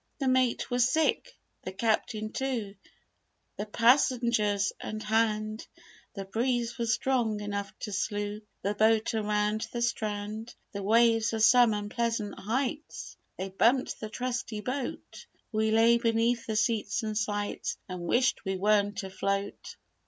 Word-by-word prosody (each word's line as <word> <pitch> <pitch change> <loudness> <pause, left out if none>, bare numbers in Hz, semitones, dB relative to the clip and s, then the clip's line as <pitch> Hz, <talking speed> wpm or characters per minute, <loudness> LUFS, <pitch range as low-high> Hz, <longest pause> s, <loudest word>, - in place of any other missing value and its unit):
"The 275 - -1
mate 255 -2 +1
was 245 0 +3
sick, 320 - +1 0.3
the 185 - -6
Captain 215 +1 -1
too, 245 -7 -2 0.8
The 210 - -4
passengers 230 -4 +3
and 215 0 -5
'hand'; 215 0 0 0.5
The 195 -1 -5
breeze 240 +3 -1
was 230 -1 +1
strong 235 -5 0
enough 205 -1 -4
to 210 - -4
slew 205 +1 -2 0.2
The 200 - 0
boat 220 +1 +3
around 210 0 0
the 240 0 -2
strand. 215 0 -3 0.2
The 200 - -5
waves 225 +2 +3
were 225 - -1
some 235 0 +6
unpleasant 215 0 -2
heights; 270 +8 -3 0.2
They 190 +1 -4
bumped 235 +7 +2
the 215 - -5
trusty 245 -2 -3
boat 270 - -5 0.2
We 220 0 +1
lay 230 +2 +5
beneath 230 0 +1
the 220 - -2
seats 215 +1 0
and 215 -1 -3
sights, 205 -1 -2
And 180 -1 -6
wished 240 +9 +1
we 190 -2 -2
weren't 205 +1 +2
afloat. 195 +1 -3
220 Hz, 135 wpm, -29 LUFS, 205-235 Hz, 0.8 s, some